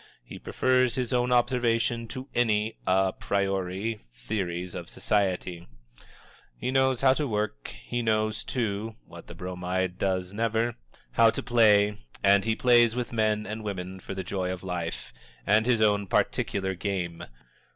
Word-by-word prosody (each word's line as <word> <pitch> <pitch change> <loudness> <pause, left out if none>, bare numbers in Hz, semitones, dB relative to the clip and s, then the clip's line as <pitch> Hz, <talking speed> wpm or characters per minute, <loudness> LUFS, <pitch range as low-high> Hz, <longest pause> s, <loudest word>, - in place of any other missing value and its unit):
He - - -10
prefers 130 -1 +1
his 125 -1 -2
own 125 0 +1
observation 120 -1 +1
to 130 +3 -7
any 110 -2 +1
a 95 0 +3
priori 100 +2 -2
theories 90 - -4
of - - -7
society. 90 -4 -1 0.9
He 125 - -2
knows 130 -1 +2
how 130 -1 +6
to 145 +1 -1
work, 105 - -2
but - - -6
he 120 0 -2
knows, 110 -1 0
too 110 -2 -2
(what - - -13
the - - -10
Bromide 90 0 -3
does 95 -1 -1
never), 115 +2 0 0.4
how 115 - +5
to - - -3
play, 105 -4 +4 0.2
and 100 +1 +5
he 110 -1 +1
plays 120 -2 +4
with 125 -1 -3
men 110 -1 +1
and 110 +1 -5
women 95 -2 -5
for 95 - -7
the 95 - -3
joy 90 0 -2
of 90 -1 -6
life, 90 -3 -4 0.3
and 110 +3 +3
his 120 -3 +3
own 105 -2 +3
particular 95 +1 0
game. 90 -3 -3
105 Hz, 155 wpm, -27 LUFS, 95-115 Hz, 0.9 s, how